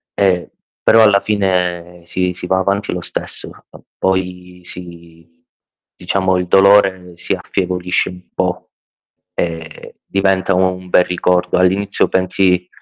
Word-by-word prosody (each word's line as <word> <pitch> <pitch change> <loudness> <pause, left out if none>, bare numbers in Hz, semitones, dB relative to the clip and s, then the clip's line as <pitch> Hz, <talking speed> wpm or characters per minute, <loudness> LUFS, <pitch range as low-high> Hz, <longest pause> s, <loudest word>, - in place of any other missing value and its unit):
Eh 95 -3 +1 0.4
però, 115 0 +7
alla 100 -2 +5
fine 90 -4 -1
sì, 90 +1 -1
si 90 - -8
va 95 +1 +1
avanti 100 +1 -1
lo 90 - -4
stesso. - - -7 0.2
Eh, - - -15 0.2
poi 90 -1 -2
si 85 -2 -12 0.7
diciamo 95 +1 0
il 90 0 -2
dolore 95 -1 +4
si - - -3
affievolisce 90 -1 -2
un 90 0 -11
po' - - -2 0.6
e 80 -2 -5
diventa 95 -1 +1
un 95 0 0
bel 90 - +5
ricordo. 90 0 0
All'inizio 95 +2 +1
pensi 95 -1 +1
90 Hz, 125 wpm, -17 LUFS, 90-95 Hz, 0.7 s, però